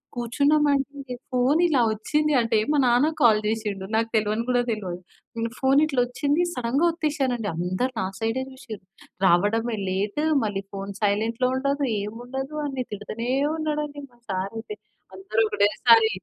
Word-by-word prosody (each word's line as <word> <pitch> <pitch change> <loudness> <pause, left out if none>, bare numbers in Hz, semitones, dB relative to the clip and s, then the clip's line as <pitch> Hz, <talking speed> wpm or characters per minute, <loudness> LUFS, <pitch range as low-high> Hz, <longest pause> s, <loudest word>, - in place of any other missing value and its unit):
కూర్చున్నాం 280 +6 +2
అంటే 275 -2 -3 0.2
ఫోన్ 255 +6 +2
ఇలా 295 -7 +2
ఒచ్చింది 300 +8 0
అంటే 230 -1 +1
మా 300 - +2
నాన్న 245 +5 +4
కాల్ 220 -3 +6
జేశిండు 210 -3 -2
నాకు 225 0 +1
తెలవని 215 +1 +1
గూడా 250 -1 +2
తెలవదు. 190 -6 -3 0.4
నేను 230 0 -2
ఫోనిట్లా 275 0 +3
ఒచ్చింది 285 +7 0
సడెన్‌గా 250 +7 0
ఓత్తేసానండి. 280 - -1
అందరు 185 +9 -1
నా - - 0
సైడే 225 +3 -1
జూసిర్రు. 230 -7 -10 0.4
"రావడమే 215 +6 +2
లేట్, 200 +9 -1 0.2
మళ్ళీ 205 -2 -2
ఫోన్ 195 0 -5
సైలెంట్‌లో 225 +5 +1
ఉండదు. 280 +1 0 0.2
ఏముండదు" 250 +7 -6
అని 270 -3 -3
తిడుతూనే 215 +3 -5 0.3
ఉన్నాడండి 300 -2 -3
మా 240 - -24
సారైతే. 220 - -4 0.4
అందరూ 380 - -1
ఒకటేసారి 220 +2 +4
240 Hz, 135 wpm, -24 LUFS, 215-275 Hz, 0.4 s, కాల్